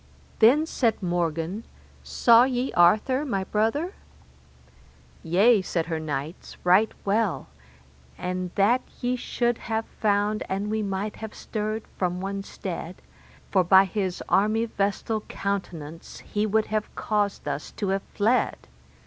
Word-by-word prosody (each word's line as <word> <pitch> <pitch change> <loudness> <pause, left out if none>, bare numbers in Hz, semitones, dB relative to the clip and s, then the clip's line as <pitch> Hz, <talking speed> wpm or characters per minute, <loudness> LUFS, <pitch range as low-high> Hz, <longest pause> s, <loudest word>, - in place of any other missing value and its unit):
Then 265 +8 +6
said 230 -9 0
Morgan, 175 +3 -1 0.4
Saw 235 0 +5
ye 255 0 -1
Arthur, 215 +10 +4
my 200 -10 -1
brother? 225 - 0 1.3
Yea, 200 +6 +4
said 170 -3 -2
her 165 -1 -3
knights, 150 +1 -5
right 185 +5 +4
well, 200 - 0 0.7
and 180 0 -3
that 230 +6 +3 0.2
ye 250 +1 0
should 240 -1 -1
have 225 0 -2
found 210 0 0
an 200 +2 -2
we 220 0 0
might 200 +1 -3
have 220 -1 -7
stirred 215 +1 -3 0.2
from 180 -1 0
one 195 +1 -3
stead, 180 -2 -6 0.6
for 190 -2 +4
by 190 +2 +6
his 190 -2 -3
armyvestal 215 0 +1
countenance 165 -6 -5
he 210 +1 -1
would 220 +1 +2
have 215 -1 -2
caused 205 -2 -1
us - - -3
to 200 - -3
have 195 0 0
fled. 225 +5 +2
205 Hz, 130 wpm, -25 LUFS, 185-220 Hz, 1.3 s, Then